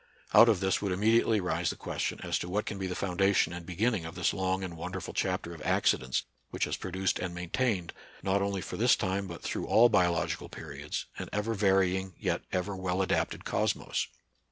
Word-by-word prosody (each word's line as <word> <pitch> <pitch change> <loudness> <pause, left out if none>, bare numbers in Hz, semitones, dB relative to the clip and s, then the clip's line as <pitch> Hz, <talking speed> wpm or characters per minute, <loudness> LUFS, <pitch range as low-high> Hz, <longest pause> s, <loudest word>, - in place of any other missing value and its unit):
Out 110 +4 +9
of 105 -5 +2
this 95 -1 +1
would 100 -2 -1
imme 105 +5 +3
diately 110 -2 +2
rise 90 -2 0
the - - -3
question - - -3
as - - -1
to 90 - -5
what 105 +4 -1
can 105 - -4
be 95 - -2
the 90 - -3
foundation 95 -1 +2
and 85 -1 -7
beginning 105 +1 0
of 80 +1 -7
this 90 -1 +1
long 95 0 0
and 90 -2 -5
won 85 +2 -5
derful 95 -3 -5
chapter 90 -2 -1
of 80 - -10
accidents 65 -1 +1 0.3
which - - -2
has - - 0
produced 95 0 -1
and 90 -1 -4
maintained, 90 +1 -1 0.3
not 95 +1 +2
only 100 -1 -1
for - - -6
this 120 +3 +5
time 95 -1 -1
but 85 -2 -8
through - - -3
all 120 +2 +6
biological 90 -6 +1
periods, - - -6
an - - -5
ever 105 +2 -1
varying 95 -2 +2
yet - - -1
ever 95 +2 -1
well 95 0 0
adapted - - -1
cosmos. - - 0
95 Hz, 205 wpm, -30 LUFS, 90-100 Hz, 0.3 s, Out